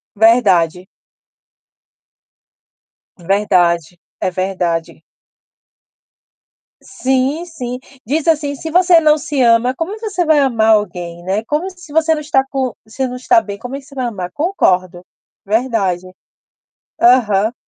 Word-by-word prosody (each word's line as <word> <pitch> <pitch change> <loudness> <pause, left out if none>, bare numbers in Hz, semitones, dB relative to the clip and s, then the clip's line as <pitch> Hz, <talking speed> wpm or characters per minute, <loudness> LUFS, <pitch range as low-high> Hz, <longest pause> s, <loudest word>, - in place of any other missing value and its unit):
Verdade. 190 -6 +3 2.3
Verdade, 175 -3 +1 0.2
é - - 0
verdade. 180 -3 -3 1.8
Sim, 265 +6 -1
sim. 250 -7 -6 0.3
Diz 305 +6 -1
assim: 295 -3 +1
"Se 320 - -7
você 355 -1 +5
não 305 -1 +4
se 290 -2 -2
ama, 235 +1 +3
como 350 +9 -4
você 405 -6 -2
vai 310 -2 +4
amar 235 -5 +2
alguém, 175 -4 -2
né. 195 +4 -1
Como 305 +8 -2
se 360 -4 -15
você 320 0 +3
não 305 - -3
está 280 -3 +1
co 265 -3 -3
se 260 +4 -3
não 250 - -6
está 300 +8 +3
bem, 200 -1 -7
como 250 +5 -7
é 275 - -5
que 270 - -18
você 275 - -16
vai 255 -2 -2
amar?" 185 -6 -5
Concordo. 185 - 0 0.4
Verdade. 205 -5 0 1.0
Aham. 225 -3 +3
245 Hz, 130 wpm, -16 LUFS, 190-300 Hz, 2.3 s, você